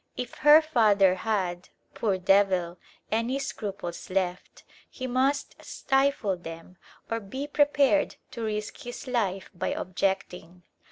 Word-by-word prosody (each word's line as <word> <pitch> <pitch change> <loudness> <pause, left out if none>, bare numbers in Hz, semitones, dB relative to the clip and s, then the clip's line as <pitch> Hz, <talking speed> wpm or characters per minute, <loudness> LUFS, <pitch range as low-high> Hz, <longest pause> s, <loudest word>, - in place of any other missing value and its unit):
If 250 -1 -4
her 300 +2 +8
father 210 -10 +4
had, 185 -3 -2 0.2
poor 205 -4 0
devil, 185 -2 +2 0.3
any 230 +4 0
scruples 200 -10 -5
left, 185 -1 -3 0.3
he 255 - -7
must 265 +3 0
stifle 270 -8 0
them 165 +1 -10 0.3
or 230 - 0
be 245 +7 -6
prepared 290 0 +2 0.2
to 235 - -7
risk 210 -1 -3
his 245 0 -7
life 205 -7 -2
by 175 - -3
objecting. 180 -2 -3
210 Hz, 120 wpm, -27 LUFS, 185-260 Hz, 0.3 s, her